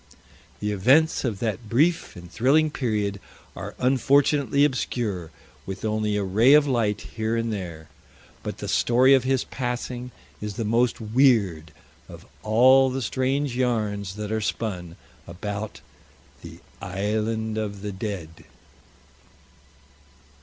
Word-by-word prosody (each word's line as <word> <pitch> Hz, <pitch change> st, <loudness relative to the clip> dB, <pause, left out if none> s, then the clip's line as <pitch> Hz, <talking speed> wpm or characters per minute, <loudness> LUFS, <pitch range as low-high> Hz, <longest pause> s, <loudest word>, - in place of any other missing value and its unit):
The 105 Hz, 0 st, -1 dB
events 135 Hz, +11 st, +3 dB
of 115 Hz, -6 st, -2 dB
that 110 Hz, -1 st, -3 dB
brief 155 Hz, +7 st, +1 dB
and 90 Hz, -1 st, -11 dB
thrilling 150 Hz, +8 st, +3 dB
period 105 Hz, -7 st, -2 dB, 0.4 s
are -, -, -7 dB
unfortunately 140 Hz, +1 st, +3 dB
obscure, 110 Hz, -, -2 dB, 0.4 s
with 95 Hz, +2 st, -5 dB
only 105 Hz, -1 st, 0 dB
a 100 Hz, -, 0 dB
ray 110 Hz, +8 st, +4 dB
of 150 Hz, -1 st, +6 dB
light 115 Hz, -6 st, 0 dB, 0.2 s
here 110 Hz, +1 st, 0 dB
and 115 Hz, -1 st, -1 dB
there. 85 Hz, -6 st, -6 dB, 0.5 s
But -, -, -6 dB
the -, -, -6 dB
story 125 Hz, +3 st, +4 dB
of 130 Hz, -2 st, +3 dB
his 130 Hz, -1 st, +1 dB
passing 125 Hz, 0 st, -4 dB, 0.3 s
is 105 Hz, -1 st, -5 dB
the 115 Hz, -, -3 dB
most 115 Hz, +3 st, +1 dB
weird 110 Hz, -, +2 dB, 0.4 s
of -, -, -12 dB, 0.2 s
all 130 Hz, +5 st, +5 dB
the 130 Hz, 0 st, -3 dB
strange 130 Hz, +1 st, -1 dB
yarns 105 Hz, -6 st, -1 dB
that 105 Hz, 0 st, -5 dB
are 110 Hz, 0 st, -1 dB
spun 90 Hz, -6 st, -3 dB, 0.3 s
about 105 Hz, +4 st, -6 dB, 0.6 s
the -, -, -11 dB, 0.2 s
"Island 110 Hz, +3 st, -2 dB
of 100 Hz, -2 st, -5 dB
the 105 Hz, -, -3 dB
Dead." 95 Hz, -5 st, -6 dB
110 Hz, 130 wpm, -24 LUFS, 100-130 Hz, 0.6 s, of